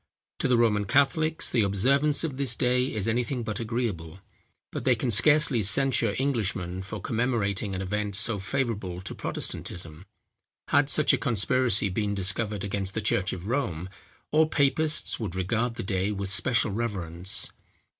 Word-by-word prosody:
To - - +1
the 125 - +3
Roman 105 -3 +2
Catholics 150 - +1
the 120 - +1
observance 135 - +2
of 145 -5 -3
this 135 -4 0
day 125 +1 +1
is 105 -2 -2
anything 120 +2 -1
but 110 +1 -4
agreeable; 110 -8 -3 0.5
but - - -5
they 130 - +3
can 120 +2 -2
scarcely 140 +2 +5
censure 115 0 +2
Englishmen 105 -9 -1
for 100 +3 -7
commemorating 110 -4 -1
an 95 - -3
event 105 +1 -2
so 105 0 +1
favourable 100 -5 -3
to 95 - -5
Protestantism. 85 +1 -4 0.6
Had 145 -1 +3
such 150 +1 +4
a - - +1
conspiracy 120 -2 +2
been 100 +2 -2
discovered 100 +2 0
against 95 -1 -3
the - - 0
church 95 -3 +1
of 90 0 -7
Rome, 95 - -2 0.4
all 155 +1 +4
papists 155 +1 +1
would 105 -6 -4
regard 115 +6 -1
the - - -5
day 95 +1 -1
with 100 -2 -4
special 115 +2 +1
reverence. 95 -5 -2
110 Hz, 155 wpm, -26 LUFS, 95-130 Hz, 0.6 s, scarcely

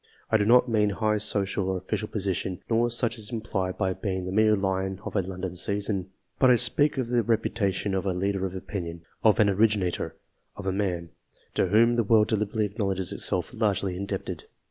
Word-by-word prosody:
I 110 - +5
do 105 -1 0
not 125 +2 +6
mean 105 -3 +2
high 105 +1 0
social 100 -2 0
or 95 - 0
official 95 +4 -3
position, 95 -3 -2
nor 115 +1 +3
such 120 0 0
as 110 - -3
is 105 - -4
implied 100 -5 -3
by 95 -2 0
being 95 -2 -3
the 90 - -4
mere 110 +2 +4
lion 95 -1 -1
of - - -6
a 100 - +3
London 95 -1 -5
season; 100 0 -1 0.3
but 130 - +5
I 125 - +7
speak 135 +5 +2
of 125 -3 -2
the 120 -1 +2
reputation 105 -3 0
of 95 +1 -1
a - - +2
leader 95 +1 -1
of 95 - -9
opinion, 85 -4 -6 0.2
of 110 -3 +4
an 105 - +5
originator, 100 -2 +1 0.4
of 100 - -8
a 95 - +1
man 90 -4 -2 0.4
to - - +1
whom 115 +5 +4
the 115 - +3
world 105 0 +4
deliberately 105 0 0
acknowledges 100 -3 -1
itself 90 +3 0
largely 100 -5 0
indebted. 100 +2 -5
100 Hz, 200 wpm, -26 LUFS, 95-110 Hz, 0.4 s, I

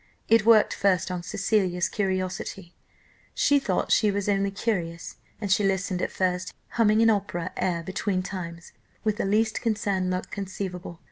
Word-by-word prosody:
It 225 -1 +4
worked 220 -2 +6
first 185 -2 +1
on 180 -1 -3
Cecilia's 185 -1 0
curiosity; 185 -2 -3 0.6
she 285 0 +4
thought 275 - -1
she 215 - +4
was 200 0 -1
only 200 -1 +2
curious, 180 -5 -3 0.2
and 205 -3 -3
she 205 - +4
listened 190 -1 0
at - - 0
first, 180 -1 -1
humming 220 -1 +3
an 225 - +6
opera 185 -4 -2
air 170 -2 -1
between 190 +1 -1
times, 170 -3 -7 0.3
with 215 -1 0
the - - -1
least 215 +2 +1
concerned 200 -5 0
look 185 0 -3
conceivable. 185 -3 -5
195 Hz, 155 wpm, -26 LUFS, 180-210 Hz, 0.6 s, worked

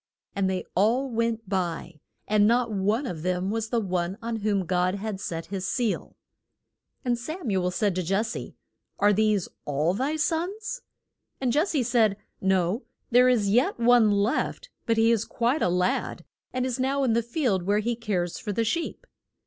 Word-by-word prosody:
And 195 -1 +1
they 185 -1 -2
all 240 +8 +2
went 230 -1 -1
by, 175 -4 -3 0.3
and 210 0 +4
not 235 0 +2
one 210 +6 0
of 170 -10 -5
them 180 +2 -1
was 225 0 -2
the 235 - +1
one 185 -2 -2
on 230 0 -3
whom 205 -3 0
God 180 +1 +1
had 200 -1 -4
set 165 -4 -4
his 190 -2 -2
seal. 240 -4 -1 0.9
And 240 -1 +1
Sam 310 - -4
u 190 -2 +1
el 180 - +1
said 200 +2 0
to 185 - -1
Jes 195 +6 0
se, - - -6 0.4
Are 205 +1 +4
these 210 -2 +2 0.2
all 150 +4 0
thy 270 +9 -1
sons? 350 +7 -2 0.6
And 255 -3 0
Jes 315 +8 +2
se 290 -8 +1
said, 225 -4 +2 0.2
No 190 +3 +1 0.3
there 250 +1 +6
is 210 -6 +2
yet 240 +2 +2
one 235 -2 +5
left; 210 - 0 0.2
but 230 -1 +2
he 225 +1 +5
is 225 -2 +2
quite 245 +7 0
a - - +3
lad, 180 +1 0 0.3
and 255 0 -1
is 255 -1 -2
now 275 +2 +1
in 245 -4 +2
the 235 - +3
field 235 - -1
where 205 +1 +3
he 230 +3 0
cares 195 -7 -2
for 210 - -4
the 230 +3 0
sheep. 335 - -2
220 Hz, 190 wpm, -26 LUFS, 190-245 Hz, 0.9 s, there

